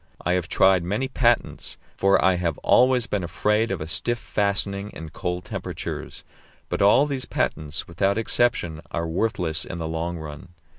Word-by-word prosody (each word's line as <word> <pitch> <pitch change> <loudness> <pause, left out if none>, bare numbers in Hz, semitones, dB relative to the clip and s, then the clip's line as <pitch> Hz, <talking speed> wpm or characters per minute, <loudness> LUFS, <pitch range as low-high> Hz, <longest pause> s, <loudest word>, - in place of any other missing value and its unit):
I 90 - +2
have 90 -2 0
tried 95 -1 +4
many 105 +9 -1
patents, 120 -3 +1 0.2
for 95 0 +4
I 95 - +5
have 85 -3 -1
always 125 -1 +5
been 100 -5 -2
afraid 105 +6 +1
of 95 -5 -3
a 75 - -4
stiff 120 +8 -1
fastening 100 -2 -1
in 80 -1 -8
cold 90 +2 -4
temperatures; - - -6 0.5
but - - -2
all 105 +8 +6
these 135 -4 -3
patents, 75 -7 -2
without 95 +4 0
exception, 110 -8 +1
are 85 0 -2
worthless 85 -3 -1
in 90 - -6
the 80 -1 -3
long 85 +2 -3
run. 80 +2 -9
95 Hz, 165 wpm, -24 LUFS, 85-110 Hz, 0.5 s, all